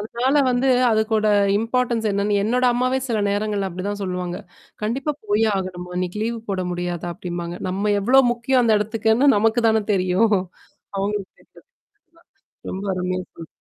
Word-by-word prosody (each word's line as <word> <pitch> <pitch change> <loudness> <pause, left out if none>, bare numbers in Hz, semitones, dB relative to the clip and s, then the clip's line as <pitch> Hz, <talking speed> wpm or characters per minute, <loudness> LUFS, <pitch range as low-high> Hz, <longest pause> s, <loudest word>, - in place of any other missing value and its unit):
அதனால 240 +6 0
வந்து 250 +2 +1 0.2
அதுக்கோட 220 0 +1 0.3
இம்பார்ட்டன்ஸ் 230 0 0
என்னன்னு 200 +1 0
என்னோட 250 +4 +1
அம்மாவே 255 +2 +1
சில 225 -3 0
நேரங்கள்ல 205 -1 -1
அப்படிதான் 200 +3 -5
சொல்லுவாங்க. 180 -2 -3 0.5
கண்டிப்பா 265 +8 -1
போயே 210 +2 +2
ஆகணுமா? 180 -1 -5
இன்னைக்கு 185 +3 -3
லீவ் 230 +1 -2
போட 185 -1 -1
முடியாதா 175 -1 -3
அப்டிம்பாங்க. 175 0 -5
நம்ம 200 +3 0
எவ்ளோ 255 +7 +5
முக்கியம் 245 +2 +1
அந்த 220 -2 +4
இடத்துக்குன்னு 220 +5 +2
நமக்கு 225 +3 +2
தானே 220 0 +2
தெரியும். 185 +4 +2 0.7
அவங்களுக்கு 200 -1 -2
தெரியாது. - - -21 0.5
ஆமா. - - -24 0.5
ரொம்ப 190 +2 -5
அருமையா 185 0 -2
சொன்னீங்க. 165 - -11
210 Hz, 145 wpm, -22 LUFS, 185-230 Hz, 0.7 s, எவ்ளோ